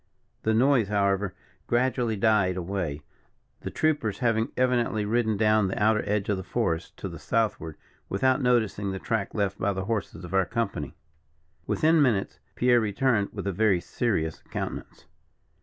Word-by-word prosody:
The 110 Hz, 0 st, +1 dB
noise, 125 Hz, -2 st, +4 dB
however, 100 Hz, -1 st, 0 dB, 0.3 s
gradually 120 Hz, -2 st, +1 dB
died 100 Hz, -3 st, +2 dB
away, 85 Hz, -5 st, -3 dB, 0.6 s
the -, -, -5 dB
troopers 145 Hz, -10 st, 0 dB
having 115 Hz, -2 st, +1 dB
evidently 120 Hz, -4 st, +1 dB
ridden 110 Hz, -1 st, +1 dB
down 110 Hz, -1 st, +3 dB
the 95 Hz, -, -3 dB
outer 105 Hz, +1 st, +3 dB
edge 105 Hz, -1 st, 0 dB
of 105 Hz, -, 0 dB
the 95 Hz, -, -5 dB
forest 90 Hz, -4 st, -2 dB
to -, -, -5 dB
the -, -, -8 dB
Southward, 105 Hz, -8 st, -1 dB, 0.3 s
without 130 Hz, +7 st, +2 dB
noticing 110 Hz, -5 st, +1 dB
the 95 Hz, -, -3 dB
track 105 Hz, +1 st, -2 dB
left 100 Hz, -2 st, -1 dB
by 100 Hz, -2 st, +1 dB
the 95 Hz, 0 st, -4 dB
horses 100 Hz, -5 st, -3 dB
of 90 Hz, -, -9 dB
our 95 Hz, -2 st, +3 dB
company. -, -, -3 dB, 0.7 s
Within 160 Hz, +1 st, +3 dB
ten -, -, +5 dB
minutes, 115 Hz, -8 st, +1 dB, 0.2 s
Pierre 125 Hz, -1 st, +4 dB
returned 110 Hz, 0 st, +1 dB
with -, -, -6 dB
a 100 Hz, -, 0 dB
very 100 Hz, -1 st, +3 dB
serious 85 Hz, -6 st, -2 dB
countenance. -, -, -6 dB
105 Hz, 160 wpm, -26 LUFS, 95-120 Hz, 0.7 s, ten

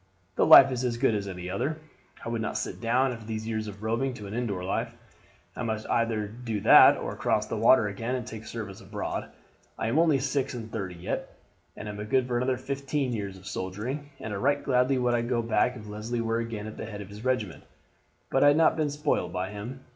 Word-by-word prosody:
The -, -, +3 dB
life 135 Hz, 0 st, +10 dB
is 125 Hz, -1 st, -2 dB
as 120 Hz, -2 st, -1 dB
good 125 Hz, -2 st, +2 dB
as 100 Hz, -2 st, -2 dB
any 90 Hz, -2 st, -6 dB
other. 135 Hz, +12 st, -2 dB, 0.5 s
I -, -, -3 dB
would 115 Hz, -1 st, -2 dB
not 110 Hz, -, -2 dB
sit -, -, -4 dB
down, 125 Hz, +3 st, +2 dB
after 115 Hz, -3 st, -8 dB
these 110 Hz, 0 st, -4 dB
years 110 Hz, -1 st, -2 dB
of 105 Hz, 0 st, -9 dB
roving, 120 Hz, +4 st, -1 dB
to 105 Hz, -, -9 dB
an 100 Hz, -, -7 dB
indoor 110 Hz, -6 st, -2 dB
life. 115 Hz, +5 st, -2 dB, 0.6 s
I -, -, -5 dB
must 110 Hz, -2 st, -3 dB
either 115 Hz, -2 st, +1 dB
do 115 Hz, 0 st, -4 dB
that -, -, +8 dB
or -, -, -4 dB
cross 105 Hz, -, +1 dB
the -, -, -4 dB
water 115 Hz, 0 st, +5 dB
again 115 Hz, +5 st, -3 dB
and 125 Hz, -3 st, -4 dB
take 110 Hz, 0 st, -8 dB
service 105 Hz, -4 st, -6 dB
abroad. -, -, -4 dB, 0.5 s
I 110 Hz, -, -1 dB
am 140 Hz, +7 st, +2 dB
only 160 Hz, -4 st, +4 dB
six 135 Hz, -1 st, -1 dB
and 115 Hz, -2 st, -7 dB
thirty 95 Hz, -5 st, -4 dB
yet, 85 Hz, +1 st, -5 dB, 0.4 s
and 105 Hz, -, -7 dB
am 105 Hz, 0 st, -5 dB
good 125 Hz, +3 st, +1 dB
for 120 Hz, -1 st, 0 dB
another 125 Hz, +1 st, 0 dB
fifteen 135 Hz, 0 st, -2 dB
years 100 Hz, -3 st, -4 dB
of 95 Hz, -, -16 dB
soldiering, 110 Hz, +11 st, -4 dB
and 110 Hz, -1 st, -5 dB
right 145 Hz, +2 st, +2 dB
gladly 130 Hz, 0 st, +2 dB
would 125 Hz, -1 st, +1 dB
I 120 Hz, -, +2 dB
go 120 Hz, 0 st, -1 dB
back 115 Hz, +2 st, +1 dB
if 105 Hz, -, -10 dB
Leslie 110 Hz, +3 st, -4 dB
were 115 Hz, 0 st, 0 dB
again 115 Hz, -3 st, -4 dB
at 110 Hz, -, -8 dB
the -, -, -5 dB
head 105 Hz, -2 st, -7 dB
of 100 Hz, -, -9 dB
his 105 Hz, +2 st, -10 dB
regiment, 125 Hz, -9 st, -1 dB, 0.7 s
but 135 Hz, -, +3 dB
I 145 Hz, 0 st, +7 dB
have 160 Hz, +2 st, +4 dB
been 155 Hz, -2 st, 0 dB
spoiled 150 Hz, 0 st, -1 dB
by 95 Hz, +2 st, -3 dB
him. 115 Hz, +6 st, -7 dB
115 Hz, 230 wpm, -28 LUFS, 105-130 Hz, 0.7 s, life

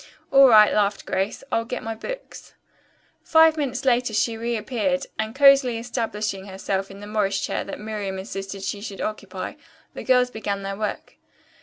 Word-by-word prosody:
"All 275 Hz, -1 st, +8 dB
right," 215 Hz, -2 st, +7 dB
laughed 205 Hz, -1 st, +1 dB
Grace. 195 Hz, +2 st, -2 dB
"I'll 230 Hz, -, +1 dB
get 250 Hz, +2 st, -5 dB
my 225 Hz, -, -3 dB
books." -, -, -9 dB, 0.7 s
Five 320 Hz, -1 st, +5 dB
minutes 270 Hz, -4 st, -3 dB
later 245 Hz, -3 st, +2 dB
she 225 Hz, +2 st, +1 dB
reappeared 235 Hz, +4 st, -1 dB
and, 220 Hz, +1 st, -2 dB
cosily 275 Hz, -4 st, +6 dB
establishing 215 Hz, -4 st, -3 dB
herself 195 Hz, 0 st, -3 dB
in 195 Hz, +1 st, -11 dB
the -, -, -8 dB
Morris 205 Hz, -2 st, 0 dB
chair -, -, -2 dB
that -, -, -7 dB
Miriam 210 Hz, -3 st, -4 dB
insisted 195 Hz, 0 st, -6 dB
she 200 Hz, +1 st, -3 dB
should 200 Hz, -2 st, -7 dB
occupy, 215 Hz, 0 st, -5 dB, 0.4 s
the -, -, -7 dB
girls 250 Hz, -1 st, +3 dB
began 200 Hz, -3 st, -3 dB
their 195 Hz, 0 st, -4 dB
work. 210 Hz, +1 st, -5 dB
220 Hz, 165 wpm, -23 LUFS, 200-250 Hz, 0.7 s, All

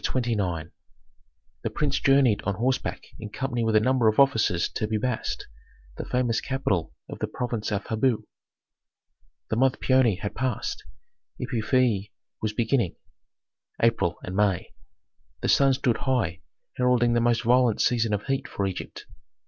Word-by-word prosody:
CHAPTER 130 Hz, -, 0 dB
XXIX 85 Hz, -7 st, -2 dB, 0.9 s
The -, -, -2 dB
prince 145 Hz, -2 st, -1 dB
journeyed 135 Hz, -6 st, +4 dB
on 100 Hz, -, -2 dB
horseback 125 Hz, +5 st, -1 dB, 0.2 s
in 110 Hz, -1 st, -7 dB
company 120 Hz, +1 st, -2 dB
with 110 Hz, -1 st, +1 dB
a -, -, +7 dB
number 125 Hz, +1 st, +2 dB
of 110 Hz, +3 st, +2 dB
officers 115 Hz, -10 st, +3 dB
to 110 Hz, -, -3 dB
Pi 110 Hz, 0 st, 0 dB
Bast, 125 Hz, +1 st, -2 dB, 0.5 s
the -, -, -5 dB
famous 125 Hz, -3 st, +1 dB
capital 130 Hz, -11 st, -1 dB, 0.2 s
of -, -, -8 dB
the -, -, -1 dB
province 120 Hz, -3 st, -3 dB
of 100 Hz, -1 st, -2 dB
Habu. 115 Hz, +1 st, 0 dB, 1.3 s
The 110 Hz, -, +1 dB
month 130 Hz, +1 st, +2 dB
Paoni 130 Hz, -7 st, +3 dB
had 100 Hz, -, -4 dB
passed, 130 Hz, -4 st, -3 dB, 0.5 s
Epiphi 115 Hz, -3 st, +1 dB, 0.3 s
was 110 Hz, -, -1 dB
beginning 115 Hz, -3 st, 0 dB, 0.8 s
(April 100 Hz, -7 st, +2 dB
and 90 Hz, -, -5 dB
May). 100 Hz, -3 st, +1 dB, 0.7 s
The -, -, -1 dB
sun 135 Hz, -1 st, +5 dB
stood 125 Hz, -3 st, +1 dB
high, 120 Hz, -10 st, -1 dB, 0.4 s
heralding 125 Hz, -1 st, +3 dB
the 120 Hz, -, +2 dB
most 120 Hz, 0 st, +2 dB
violent 120 Hz, -1 st, +3 dB
season 115 Hz, -3 st, +2 dB
of 105 Hz, -1 st, -1 dB
heat 135 Hz, -1 st, -1 dB
for 100 Hz, -, -2 dB
Egypt. 95 Hz, -2 st, -6 dB
115 Hz, 150 wpm, -26 LUFS, 105-130 Hz, 1.3 s, a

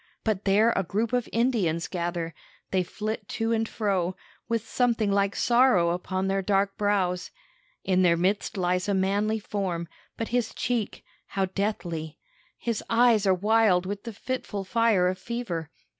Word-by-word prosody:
But 210 Hz, -3 st, -1 dB
there 210 Hz, +4 st, +4 dB
a -, -, +2 dB
group 215 Hz, +6 st, -2 dB
of 245 Hz, -1 st, 0 dB
Indians 215 Hz, -9 st, +1 dB
gather. 170 Hz, -2 st, -3 dB, 0.4 s
They 190 Hz, -, +2 dB
flit 215 Hz, +3 st, -4 dB
to 225 Hz, 0 st, 0 dB
and 225 Hz, -1 st, 0 dB
fro, 185 Hz, -4 st, 0 dB, 0.3 s
with 230 Hz, -1 st, -1 dB
something 230 Hz, -4 st, +1 dB
like 200 Hz, 0 st, +1 dB
sorrow 235 Hz, -9 st, +4 dB
upon 185 Hz, +2 st, -2 dB
their 195 Hz, 0 st, +1 dB
dark 195 Hz, 0 st, +1 dB
brows. 190 Hz, -3 st, 0 dB, 0.5 s
In 185 Hz, -1 st, +2 dB
their 170 Hz, -2 st, +4 dB
midst 195 Hz, +4 st, 0 dB
lies 180 Hz, +1 st, 0 dB
a 200 Hz, -, +2 dB
manly 200 Hz, +3 st, +1 dB
form, 190 Hz, -5 st, -3 dB, 0.3 s
but 225 Hz, -, -3 dB
his 240 Hz, -2 st, -1 dB
cheek, 235 Hz, -4 st, -2 dB, 0.2 s
how 195 Hz, -1 st, 0 dB
deathly! 175 Hz, -5 st, -3 dB, 0.4 s
His 230 Hz, -3 st, -2 dB
eyes 230 Hz, -3 st, +4 dB
are 190 Hz, -, +5 dB
wild 205 Hz, -2 st, +3 dB
with 200 Hz, +1 st, -4 dB
the 230 Hz, -, -5 dB
fitful 210 Hz, -3 st, -4 dB
fire 215 Hz, -2 st, +3 dB
of 185 Hz, 0 st, -1 dB
fever. 190 Hz, -9 st, -4 dB
200 Hz, 160 wpm, -27 LUFS, 180-225 Hz, 0.5 s, are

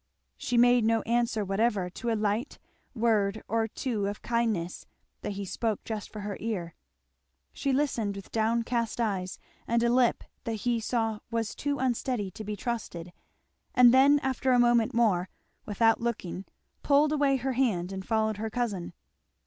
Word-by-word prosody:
She 245 Hz, -, -2 dB
made 245 Hz, 0 st, +5 dB
no 225 Hz, 0 st, +2 dB
answer 230 Hz, -2 st, 0 dB
whatever 195 Hz, -1 st, +1 dB
to 210 Hz, +6 st, -5 dB
a 225 Hz, -, +2 dB
ligit 215 Hz, +4 st, -1 dB, 0.4 s
word 220 Hz, -3 st, +1 dB
or 225 Hz, 0 st, 0 dB
two 220 Hz, -3 st, -2 dB
of 205 Hz, 0 st, -5 dB
kindness 225 Hz, -7 st, -1 dB, 0.3 s
that 205 Hz, -, -4 dB
he 200 Hz, 0 st, -5 dB
spoke 220 Hz, +2 st, -2 dB
just 215 Hz, -2 st, -5 dB
for 210 Hz, -, -7 dB
her 200 Hz, 0 st, -4 dB
ear. 185 Hz, -7 st, -3 dB, 0.8 s
She 275 Hz, -, -1 dB
listened 250 Hz, -7 st, 0 dB
with 195 Hz, -, -10 dB
downcast 230 Hz, +1 st, 0 dB
eyes 195 Hz, -5 st, -1 dB, 0.3 s
and 235 Hz, 0 st, +2 dB
a 235 Hz, -, +3 dB
lip 250 Hz, -2 st, +3 dB, 0.2 s
that 225 Hz, -2 st, -4 dB
he 240 Hz, -1 st, +2 dB
saw 225 Hz, -1 st, -1 dB
was 230 Hz, -2 st, -2 dB
too 285 Hz, 0 st, -2 dB
unsteady 245 Hz, -5 st, -1 dB
to 215 Hz, -, -8 dB
be 210 Hz, 0 st, -4 dB
trusted, 180 Hz, -7 st, -5 dB, 0.6 s
and 245 Hz, -1 st, +7 dB
then 275 Hz, +3 st, +6 dB
after 265 Hz, 0 st, 0 dB
a -, -, +5 dB
moment 240 Hz, 0 st, +3 dB
more, 195 Hz, -6 st, +2 dB, 0.4 s
without 225 Hz, +2 st, +3 dB
looking, 195 Hz, -5 st, -3 dB, 0.4 s
pulled 290 Hz, +1 st, +4 dB
away 285 Hz, -2 st, +3 dB
her 265 Hz, 0 st, -1 dB
hand 205 Hz, -9 st, 0 dB
and 190 Hz, 0 st, -5 dB
followed 220 Hz, 0 st, 0 dB
her 220 Hz, +1 st, -3 dB
cousin. 210 Hz, -8 st, -3 dB
225 Hz, 165 wpm, -28 LUFS, 205-240 Hz, 0.8 s, and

